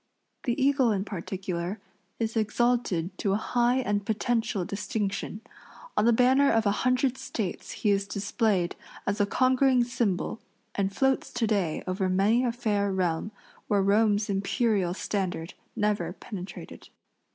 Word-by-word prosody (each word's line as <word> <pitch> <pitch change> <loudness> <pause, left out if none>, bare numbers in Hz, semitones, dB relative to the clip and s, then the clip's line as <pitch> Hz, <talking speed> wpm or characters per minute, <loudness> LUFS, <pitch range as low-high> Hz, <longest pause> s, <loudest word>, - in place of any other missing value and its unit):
The 240 +2 0
eagle, 270 -3 +3
in 200 -1 -1
particular, 185 0 -4 0.4
is 225 0 -2
exalted 215 -5 +1
to 195 - +1
a - - +2
high 240 +2 +1
and 205 -5 0
potential 220 -2 0
distinction. 200 +1 -3 0.5
On 210 - +3
the 235 - +6
banner 260 +4 +4
of 225 -1 +2
a 200 - +4
hundred 255 +1 +1
States 200 -6 -4
he 210 - +1
is 200 0 +1
displayed 200 -2 0 0.3
as 200 +1 0
a 205 - +2
conquering 255 +2 +3
symbol 235 -4 -1 0.3
and 195 -1 0
floats 265 +6 +1
to 230 - +1
day 195 -7 0
over 185 +1 -1
many 205 +6 +3
a 245 - +1
fair 210 -4 0
realm 185 +1 -1 0.4
where 200 -2 +2
Rome's 205 +1 +3
imperial 200 -2 +1
standard 185 -5 -3 0.2
never 210 -1 0
penetrated. 190 -3 -9
210 Hz, 140 wpm, -27 LUFS, 195-240 Hz, 0.5 s, the